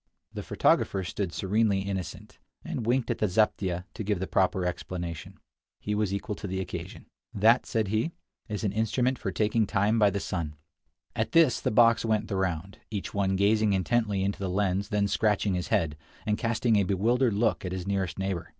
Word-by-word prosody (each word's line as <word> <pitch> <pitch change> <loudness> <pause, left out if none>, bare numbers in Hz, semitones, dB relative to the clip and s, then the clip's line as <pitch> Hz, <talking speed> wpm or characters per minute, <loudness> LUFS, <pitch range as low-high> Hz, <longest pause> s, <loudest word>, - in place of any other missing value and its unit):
The - - -4
photographer 95 - +1
stood 90 +1 -3
serenely 100 +2 +1
innocent, 95 -2 -6 0.3
and 115 - -4
winked 125 0 +1
at - - -3
the 105 - +2
zaptieh 95 -3 +1
to 110 - -5
give 100 -2 -1
the 95 - -2
proper 95 -1 +1
explanation. 90 0 -5 0.4
He 105 - -3
was 105 -2 0
equal 100 +2 -3
to 105 - -6
the 95 0 -3
occasion. 95 - -6 0.3
"That," 115 +5 +4
said 110 -4 0
he, 110 +10 0 0.4
"is 105 0 -3
an 100 - +1
instrument 115 +4 0
for - - -3
taking 110 0 +1
time 105 +2 +2
by 105 -2 +5
the 100 +1 -2
sun." 85 -6 -4 0.6
At - - -2
this 165 -7 +5
the - - 0
box 115 0 +5
went 110 -2 0
the 100 - -2
round, 95 0 -2
each 100 -5 -5
one 95 -1 +1
gazing 105 +1 +3
intently 100 +1 +1
into 100 +1 -2
the 95 -2 -2
lens, 95 +1 0
then 105 -2 +1
scratching 105 -1 +1
his 90 -1 -2
head, 75 -2 0 0.3
and 105 - +1
casting 115 0 +1
a 100 - +3
bewildered 110 +5 +2
look 110 +1 +1
at 90 - -4
his 90 -1 -4
nearest 95 -3 -1
neighbor. 95 -2 -3
100 Hz, 195 wpm, -28 LUFS, 95-110 Hz, 0.6 s, by